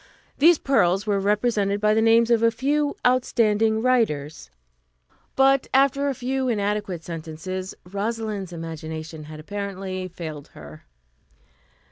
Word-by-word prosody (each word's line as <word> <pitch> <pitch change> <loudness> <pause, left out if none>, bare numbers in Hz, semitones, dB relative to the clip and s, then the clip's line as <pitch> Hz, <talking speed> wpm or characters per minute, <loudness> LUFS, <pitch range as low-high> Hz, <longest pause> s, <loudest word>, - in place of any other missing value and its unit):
These 330 +3 +6
pearls 195 -9 +2
were 205 -2 +1
represented 205 0 +1
by 210 +1 +3
the 220 - +2
names 230 +1 +4
of 230 -1 +4
a 230 - +5
few 285 +5 0
outstanding 225 -3 +2
writers, 155 - 0 0.9
but 270 0 +4
after 275 +1 +3
a 275 - -2
few 260 +1 -2
inadequate 205 -5 -2
sentences 170 +3 -6
Rosalind's 205 0 -4
imagination 160 -1 -7
had 155 0 -10
apparently 190 +1 -5
failed 160 -5 -8
her. 75 +1 -12
205 Hz, 120 wpm, -24 LUFS, 175-235 Hz, 0.9 s, These